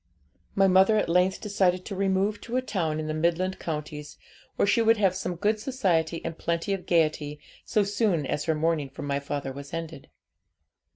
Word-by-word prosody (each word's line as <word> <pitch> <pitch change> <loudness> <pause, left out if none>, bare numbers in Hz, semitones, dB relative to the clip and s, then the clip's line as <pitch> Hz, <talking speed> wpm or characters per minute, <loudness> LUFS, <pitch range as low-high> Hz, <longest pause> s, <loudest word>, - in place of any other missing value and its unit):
'My 195 0 +5
mother 190 +3 +5
at - - +1
length 180 +2 +2
decided 190 -4 +1
to 200 - -5
remove 195 +2 0
to 245 +1 -3
a - - +2
town 165 -9 -1
in 155 - -3
the 155 - -2
midland 175 +4 0
counties, 150 -2 -5 0.4
where - - +2
she 205 +3 +3
would 225 0 +4
have 195 -3 +3
some 180 -1 -3
good 210 +5 0
society 180 - 0
and 165 -1 -5
plenty 170 +4 -1
of 190 -2 -5
gaiety, 155 -3 +1 0.3
so 210 -2 +2
soon 200 -6 0
as 145 - -2
her 160 - +1
mourning 155 -2 0
for 140 - -9
my 140 0 -1
father 140 -1 -4
was 140 +3 -8
ended. 165 -4 -7
175 Hz, 190 wpm, -27 LUFS, 155-200 Hz, 0.4 s, My